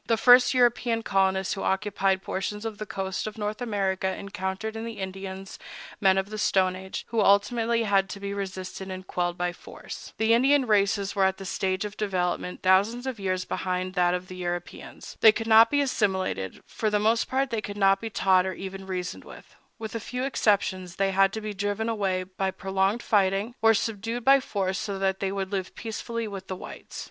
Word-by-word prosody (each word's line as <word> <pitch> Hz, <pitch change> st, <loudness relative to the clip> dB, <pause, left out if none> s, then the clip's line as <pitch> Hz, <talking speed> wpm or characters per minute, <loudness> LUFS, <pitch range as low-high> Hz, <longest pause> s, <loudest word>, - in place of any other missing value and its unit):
The 230 Hz, -, +2 dB
first 245 Hz, +3 st, +6 dB
European 240 Hz, -2 st, +2 dB
colonists 190 Hz, -1 st, +1 dB
who 195 Hz, -, -5 dB
occupied 195 Hz, -1 st, 0 dB
portions 210 Hz, +3 st, -4 dB
of 220 Hz, -2 st, -5 dB
the 215 Hz, -, -5 dB
coast 190 Hz, +1 st, -3 dB
of 215 Hz, +1 st, -7 dB
North 210 Hz, +2 st, -3 dB
America 195 Hz, -5 st, -1 dB
encountered 195 Hz, +2 st, -4 dB
in 225 Hz, -, -4 dB
the 230 Hz, -1 st, -6 dB
Indians 190 Hz, 0 st, -6 dB, 0.4 s
men 190 Hz, -1 st, +4 dB
of 195 Hz, +2 st, -1 dB
the 215 Hz, -, -4 dB
Stone 185 Hz, -2 st, +2 dB
Age, 190 Hz, 0 st, -7 dB
who 230 Hz, -2 st, +1 dB
ultimately 230 Hz, +3 st, +3 dB
had 195 Hz, -2 st, +2 dB
to 200 Hz, -, -6 dB
be 200 Hz, 0 st, -4 dB
resisted 190 Hz, -1 st, -5 dB
and 185 Hz, 0 st, -6 dB
quelled 175 Hz, -1 st, -2 dB
by 175 Hz, 0 st, -1 dB
force. -, -, -10 dB
The 220 Hz, +1 st, +3 dB
Indian 270 Hz, +3 st, +4 dB
races 200 Hz, -2 st, +1 dB
were 195 Hz, -1 st, +3 dB
at 190 Hz, 0 st, 0 dB
a 195 Hz, -, -7 dB
stage 190 Hz, +1 st, -1 dB
of 205 Hz, 0 st, -7 dB
development 180 Hz, -3 st, -2 dB
thousands 200 Hz, +7 st, +3 dB
of 260 Hz, -4 st, -4 dB
years 185 Hz, -1 st, -1 dB
behind 185 Hz, 0 st, -2 dB
that 180 Hz, -1 st, +2 dB
of 180 Hz, 0 st, -5 dB
the 185 Hz, -, -9 dB
Europeans. 175 Hz, -1 st, -6 dB
They 220 Hz, -, +9 dB
could 225 Hz, +1 st, -4 dB
not 225 Hz, 0 st, +7 dB
be 285 Hz, 0 st, +2 dB
assimilated; 190 Hz, -, -1 dB
for 215 Hz, -, -2 dB
the 210 Hz, -, +2 dB
most 220 Hz, +2 st, +2 dB
part 265 Hz, 0 st, 0 dB
they 225 Hz, -2 st, -1 dB
could 205 Hz, -1 st, -7 dB
not 195 Hz, -1 st, +4 dB
be 225 Hz, -, -4 dB
taught 190 Hz, -3 st, +3 dB
or 190 Hz, -, -2 dB
even 190 Hz, +1 st, -7 dB
reasoned 180 Hz, -1 st, -4 dB
with; -, -, -14 dB, 0.2 s
with 220 Hz, -1 st, -6 dB
a 230 Hz, -, -2 dB
few 250 Hz, +3 st, -4 dB
exceptions 190 Hz, -8 st, 0 dB
they 195 Hz, 0 st, +1 dB
had 195 Hz, 0 st, +4 dB
to 220 Hz, -, -4 dB
be 215 Hz, -1 st, -4 dB
driven 205 Hz, +2 st, -2 dB
away 195 Hz, -5 st, 0 dB
by 190 Hz, +1 st, -3 dB
prolonged 195 Hz, +4 st, -1 dB
fighting, 200 Hz, +2 st, +1 dB
or 225 Hz, 0 st, +5 dB
subdued 225 Hz, +3 st, -3 dB
by 275 Hz, +1 st, +7 dB
force 195 Hz, -7 st, -2 dB
so 205 Hz, -3 st, -3 dB
that 190 Hz, 0 st, 0 dB
they 195 Hz, -1 st, -1 dB
would 195 Hz, -1 st, -3 dB
live 190 Hz, -2 st, -3 dB
peaceably 230 Hz, 0 st, -4 dB
with 195 Hz, -2 st, -7 dB
the 185 Hz, -, -4 dB
whites. -, -, -9 dB
195 Hz, 205 wpm, -26 LUFS, 190-220 Hz, 0.4 s, They